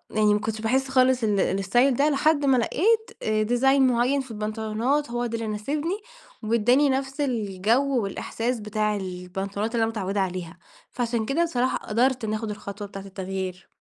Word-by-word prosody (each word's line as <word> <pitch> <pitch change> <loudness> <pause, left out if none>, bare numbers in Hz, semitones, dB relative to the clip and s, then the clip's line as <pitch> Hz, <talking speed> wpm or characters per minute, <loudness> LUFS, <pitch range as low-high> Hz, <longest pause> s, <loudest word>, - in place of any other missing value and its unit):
يعني 210 -1 +4
ما 210 - +2
كنتش 220 +1 -4
باحس 265 +4 +1
خالص 255 -1 +3
ال 210 -2 +2
الاستايل 195 +9 +2
ده، 285 +4 +3
لحد 295 0 +2
ما 265 -2 +4
لقيت 440 - +1
آآ 215 0 +1
ديزاين 265 +4 +3
معين 250 +3 +2
في 260 -3 -10
البنطلونات، 220 +6 -1
هو 240 0 -1
ده 230 -1 -3
اللي 225 -1 -4
ناسبني 290 - -2 0.5
واداني 240 +6 +3
نفس 270 +2 -1
الجو 235 +1 +1
والإحساس 230 +4 -3
بتاع 210 0 -1
البنطلونات 195 +3 -4
اللي 230 - +2
أنا 225 - 0
متعودة 200 -2 -2
عليها، 180 -2 -4 0.3
فعشان 235 -2 -1
كده 290 +8 +1
بصراحة 260 -6 0
قدرت 245 +3 0
إني 215 0 -1
أخد 220 0 -4
الخطوة 205 0 -7
بتاعة 195 -1 -9
التغيير. 190 -1 -6
225 Hz, 170 wpm, -25 LUFS, 210-265 Hz, 0.5 s, يعني